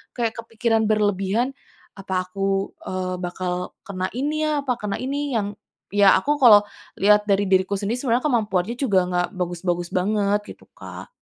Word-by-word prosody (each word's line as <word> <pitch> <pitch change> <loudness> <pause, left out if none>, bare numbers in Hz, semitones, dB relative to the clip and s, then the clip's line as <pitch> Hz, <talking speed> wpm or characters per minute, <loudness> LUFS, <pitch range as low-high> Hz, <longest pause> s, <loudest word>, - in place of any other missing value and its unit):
kayak 230 -2 -1
kepikiran 225 -1 0
berlebihan, 210 +3 +1 0.5
"Apa 190 -1 -2
aku, 195 +1 -1 0.2
eee, 185 0 -2
bakal 180 0 -4
kena 185 -3 -3
ini 305 +4 -1
ya, 295 -2 0
apa 255 -3 0
kena 210 -1 -3
ini 280 +1 -2
yang" 205 -2 -1 0.4
ya, 200 -1 +6
aku 295 +1 0
kalau 215 -5 +8 0.4
lihat 210 +1 +4
dari 200 0 +3
diriku 190 +1 +2
sendiri 210 +5 -2
sebenarnya 250 0 +1
kemampuannya 220 -5 0
juga 210 -9 +3
enggak 180 0 0
bagus-bagus 175 -1 -2
banget 205 +2 +1
gitu, - - -21
Kak. - - -10
205 Hz, 155 wpm, -23 LUFS, 185-235 Hz, 0.5 s, kalau